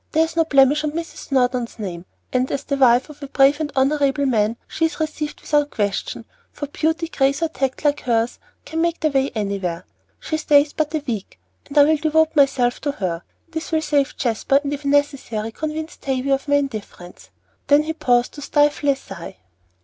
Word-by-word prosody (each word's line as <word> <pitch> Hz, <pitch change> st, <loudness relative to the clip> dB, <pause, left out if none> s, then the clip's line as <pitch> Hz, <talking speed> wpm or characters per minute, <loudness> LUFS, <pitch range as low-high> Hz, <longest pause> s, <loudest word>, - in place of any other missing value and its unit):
There 320 Hz, -, +4 dB
is 325 Hz, -, -9 dB
no 330 Hz, -1 st, +3 dB
blemish 285 Hz, 0 st, +4 dB
on 300 Hz, -1 st, -2 dB
Mrs. 330 Hz, 0 st, -6 dB
Snowdon's 250 Hz, -3 st, 0 dB
name, 180 Hz, -5 st, -6 dB, 0.3 s
and, 255 Hz, 0 st, +1 dB
as 275 Hz, -, -2 dB
the 280 Hz, -, -1 dB
wife 250 Hz, -2 st, +4 dB
of 300 Hz, -, -16 dB
a 280 Hz, -, -6 dB
brave 275 Hz, +2 st, +4 dB
and 300 Hz, -2 st, -2 dB
honorable 280 Hz, +1 st, +2 dB
man, 225 Hz, -3 st, +1 dB
she 325 Hz, -, 0 dB
is 325 Hz, -, -3 dB
received 305 Hz, -1 st, -3 dB
without 295 Hz, -1 st, +1 dB
question; 205 Hz, -5 st, -2 dB, 0.3 s
for 290 Hz, -, -5 dB
beauty, 320 Hz, +3 st, -1 dB
grace, 275 Hz, 0 st, +1 dB
or 330 Hz, -, +1 dB
tact 270 Hz, 0 st, -3 dB
like 290 Hz, 0 st, +3 dB
hers 230 Hz, -1 st, 0 dB, 0.3 s
can 325 Hz, +1 st, -2 dB
make 340 Hz, 0 st, 0 dB
their 310 Hz, -, +1 dB
way 270 Hz, 0 st, +1 dB
anywhere. 195 Hz, -5 st, -3 dB, 0.3 s
She 315 Hz, -, -2 dB
stays 290 Hz, -1 st, +3 dB
but 310 Hz, 0 st, -1 dB
a 305 Hz, -, -2 dB
week, 220 Hz, -5 st, -5 dB, 0.3 s
and 290 Hz, -, -6 dB
I 290 Hz, -, +9 dB
will 310 Hz, +2 st, +3 dB
devote 315 Hz, +1 st, +2 dB
myself 260 Hz, -4 st, +3 dB
to 285 Hz, -2 st, -1 dB
her; 175 Hz, -9 st, -3 dB, 0.3 s
this 320 Hz, 0 st, -5 dB
will 315 Hz, -1 st, +1 dB
save 290 Hz, -2 st, +1 dB
Jasper, 255 Hz, +3 st, +1 dB
and, 285 Hz, 0 st, -2 dB
if 285 Hz, 0 st, -6 dB
necessary, 275 Hz, -6 st, 0 dB
convince 310 Hz, +4 st, -5 dB
Tavie 265 Hz, 0 st, -2 dB
of 270 Hz, +2 st, -2 dB
my 285 Hz, -, +3 dB
indifference 215 Hz, -10 st, -5 dB, 0.2 s
" -, -, -42 dB
Then 290 Hz, +1 st, +5 dB
he 320 Hz, +1 st, -3 dB
paused 245 Hz, -5 st, +1 dB
to 290 Hz, -, -9 dB
stifle 290 Hz, 0 st, +2 dB
a 280 Hz, -, +4 dB
sigh. 195 Hz, -, -10 dB
280 Hz, 205 wpm, -21 LUFS, 250-305 Hz, 0.3 s, I